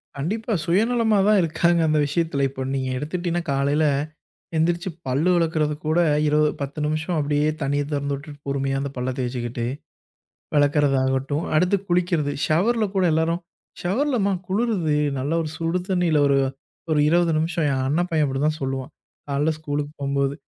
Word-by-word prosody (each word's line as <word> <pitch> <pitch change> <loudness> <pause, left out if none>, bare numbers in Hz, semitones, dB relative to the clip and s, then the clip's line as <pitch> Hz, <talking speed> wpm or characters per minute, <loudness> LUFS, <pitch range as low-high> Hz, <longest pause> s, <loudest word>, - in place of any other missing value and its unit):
கண்டிப்பா. 215 - -2
சுயநலமா 220 +4 +2
தான் 210 -1 +5
இருக்காங்க 170 +1 +2
அந்த 155 0 +2
விஷயத்துல. 145 -1 0
இப்ப 130 0 -5
நீங்க 130 -1 -2
எடுத்துட்டீனா, 175 +4 -2
காலைல, 140 +3 +2 0.7
எந்திரிச்சு 170 +3 +1 0.2
பல்லு 140 +7 +1
விளக்குறது 160 -3 +1
கூட 155 +2 +2 0.3
இருவ 150 +1 +3 0.2
10 140 +2 -4
நிமிஷம் 155 +3 -1
அப்டியே 150 +1 +1
தண்ணிய 145 +1 0
தொறந்துட்டுட்டு 140 +1 -4
பொறுமையா 135 0 -1
அந்தப் 140 0 -4
பல்ல 125 +1 -2
தேச்சுக்கிட்டே, 120 -1 -3 0.9
வெளக்கறதாகட்டும். 145 0 +2
அடுத்து 180 +5 +3
குளிக்கறது, 175 -4 +1
ஷவர்ல 215 +8 +2
கூட 190 - +2
எல்லாரும் 165 +2 +1 0.4
ஷவர்ல 255 +10 0
மா 200 - +2 0.2
குளுருது 190 -7 0 0.2
நல்ல 140 +4 -2
ஒரு 155 - -4
சுடு 165 +2 0
தண்ணில 175 -5 +2
ஒரு 140 -1 +3 0.5
ஒரு 155 - +3
20 170 0 +3
நிமிஷம். 160 0 0
ஏன் 130 -1 0
அண்ண 150 +6 +1
பையன் 155 -2 +2
அப்டிதான் 145 +3 0
சொல்லுவான். 135 +1 -3 0.4
காலைல 145 +3 +1
ஸ்கூலுக்கு 145 -1 -3
போம்போது. 140 0 0
155 Hz, 145 wpm, -23 LUFS, 140-175 Hz, 0.9 s, தான்